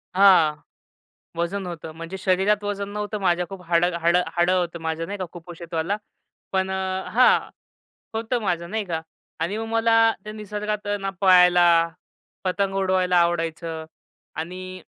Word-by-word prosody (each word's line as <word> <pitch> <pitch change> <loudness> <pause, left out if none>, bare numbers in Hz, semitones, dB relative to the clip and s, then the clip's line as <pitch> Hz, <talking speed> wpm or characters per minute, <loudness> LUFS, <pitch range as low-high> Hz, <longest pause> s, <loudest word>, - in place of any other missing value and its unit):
हां, 185 -6 +6 0.8
वजन 180 +3 -2
होतं 165 -2 -7
म्हणजे 165 +3 -6
शरीरात 195 +3 +1
वजन 200 -1 -3
नव्हतं 210 +1 -3
माझ्या. 180 -2 +1
खूप 195 -2 -8
हाड 170 0 +3 0.2
हाड 170 +1 +3 0.2
हाडं 175 +1 +3
होतं 170 -2 -2
माझं 160 +1 -2
नाही 205 +2 -5
का 185 - -2
कुपोषितवाला, 170 +2 -4 0.6
पण 190 0 0
अ - - -1 0.4
हां, 250 +2 +6 0.8
होतं 230 +2 -1
माझं 170 -3 -2
नाही 220 -1 -1
का 165 -4 -3 0.4
आणि 175 +6 -1
मग 225 - -4
मला, 225 0 +3 0.3
ते 215 - -6
निसर्गात 210 0 -4
आहे 205 0 0
ना 195 0 -3
पाळायला, 180 -2 +6 0.8
पतंग 195 +1 0
उडवायला 185 -1 +2
आवडायचं 165 -1 -1 0.5
आणि 185 +3 -6
185 Hz, 145 wpm, -24 LUFS, 170-205 Hz, 0.8 s, हां